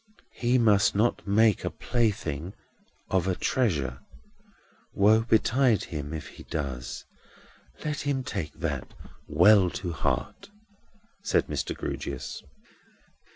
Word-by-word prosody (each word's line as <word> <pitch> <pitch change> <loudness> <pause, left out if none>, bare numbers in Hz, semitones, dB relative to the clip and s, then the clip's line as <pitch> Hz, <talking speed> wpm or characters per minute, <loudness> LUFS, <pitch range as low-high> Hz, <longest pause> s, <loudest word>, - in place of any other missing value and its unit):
"He 120 +1 +1
must 105 -5 +4
not 110 0 +1
make 105 0 +3
a - - -1
plaything 95 - -2 0.6
of 95 -1 +2
a 95 - +1
treasure. 75 - 0 1.0
Woe 105 +3 +5
betide 115 0 +3
him 75 -3 -5
if 80 -2 -5
he - - -13
does! 65 -5 -5 0.8
Let 150 -1 -2
him 140 -2 -1
take 80 -11 -4
that - - -4 0.3
well 90 +5 +6
to 90 -2 -4
heart," 200 - -2 0.7
said - - +1
Mr. - - -3
Grewgious. - - -5
100 Hz, 110 wpm, -27 LUFS, 80-120 Hz, 1.0 s, well